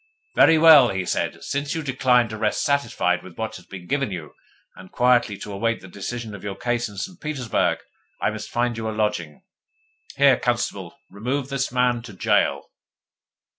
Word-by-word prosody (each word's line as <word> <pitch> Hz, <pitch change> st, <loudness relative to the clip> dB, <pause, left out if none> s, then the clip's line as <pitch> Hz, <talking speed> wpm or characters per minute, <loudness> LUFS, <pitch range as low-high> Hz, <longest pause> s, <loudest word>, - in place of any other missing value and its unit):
'Very 160 Hz, -, +6 dB
well,' 155 Hz, -6 st, +8 dB
he 95 Hz, -1 st, -2 dB
said. -, -, -2 dB
'Since 145 Hz, +2 st, -2 dB
you 160 Hz, -, -3 dB
decline 125 Hz, -3 st, +2 dB
to 110 Hz, -, -6 dB
rest 105 Hz, -1 st, 0 dB
satisfied 120 Hz, -11 st, +1 dB
with 90 Hz, -2 st, -13 dB
what 110 Hz, -, -4 dB
has 90 Hz, -1 st, -17 dB
been 95 Hz, -2 st, -9 dB
given 140 Hz, +2 st, -1 dB
you, 85 Hz, -6 st, -7 dB, 0.4 s
and 95 Hz, 0 st, -13 dB
quietly 120 Hz, -4 st, +2 dB
to 105 Hz, -, -8 dB
await 115 Hz, +3 st, -1 dB
the 95 Hz, -, -12 dB
decision 110 Hz, +4 st, -6 dB
of 100 Hz, -, -9 dB
your 100 Hz, -1 st, -4 dB
case 120 Hz, +2 st, -1 dB
in 100 Hz, -, -13 dB
St. 180 Hz, -, -6 dB
Petersburg, 140 Hz, -7 st, 0 dB, 0.4 s
I -, -, 0 dB
must 110 Hz, -1 st, -7 dB
find 120 Hz, -1 st, -1 dB
you 110 Hz, -1 st, -3 dB
a 110 Hz, -, -5 dB
lodging. 95 Hz, -9 st, -2 dB, 0.7 s
Here, 140 Hz, -2 st, +5 dB
constable, 110 Hz, -7 st, -2 dB
remove 130 Hz, +6 st, -3 dB
the 135 Hz, 0 st, -1 dB
man 125 Hz, -1 st, +1 dB
to 115 Hz, -3 st, -11 dB
gaol. 95 Hz, -, +1 dB
115 Hz, 180 wpm, -23 LUFS, 100-130 Hz, 0.7 s, well